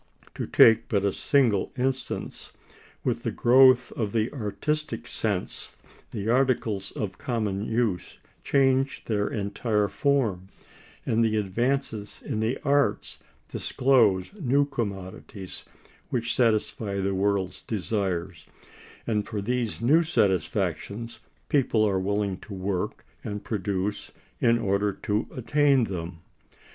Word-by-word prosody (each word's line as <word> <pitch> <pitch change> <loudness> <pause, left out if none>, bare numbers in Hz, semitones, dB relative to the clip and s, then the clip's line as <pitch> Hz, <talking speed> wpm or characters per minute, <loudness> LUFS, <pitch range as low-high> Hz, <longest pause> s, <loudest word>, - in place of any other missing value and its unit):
To - - -4
take 115 -1 +6
but 100 -2 +1
a 100 - +1
single 120 -9 +2
instance, 130 0 -3 0.5
with - - -1
the - - -1
growth 130 0 +5
of 105 -4 -3
the 115 +2 0
artistic 140 +6 -3
sense - - -3 0.3
the 100 +1 -5
articles 115 -6 +1
of 105 -8 -4
common 105 -5 -2
use 110 -6 -1 0.3
change 135 -1 +2
their 105 -2 0
entire 105 0 0
form; 110 -5 0 0.6
and 115 +1 +2
the 110 -1 +2
advances 110 +1 -1
in 110 - -2
the 110 +4 0
arts 145 0 +1 0.3
disclose 115 -9 +2
new 145 -7 +2
commodities 100 -6 -6 0.4
which 120 -1 -1
satisfy 110 -3 +1
the 95 0 0
world's 95 -1 0
desires, 95 -5 -3 0.6
and 105 -3 -1
for 110 - -3
these 115 +1 -2
new 150 +8 +5
satisfactions 110 - -1 0.3
people 120 -6 +2
are 95 -2 +1
willing 100 0 -1
to 100 - -9
work 95 -1 -3 0.2
and 105 0 -5
produce 100 -1 -2 0.3
in 115 -1 +4
order 100 -2 0
to 105 +3 -2
attain 140 +1 +3
them. 85 -4 -5
110 Hz, 120 wpm, -26 LUFS, 100-125 Hz, 0.6 s, take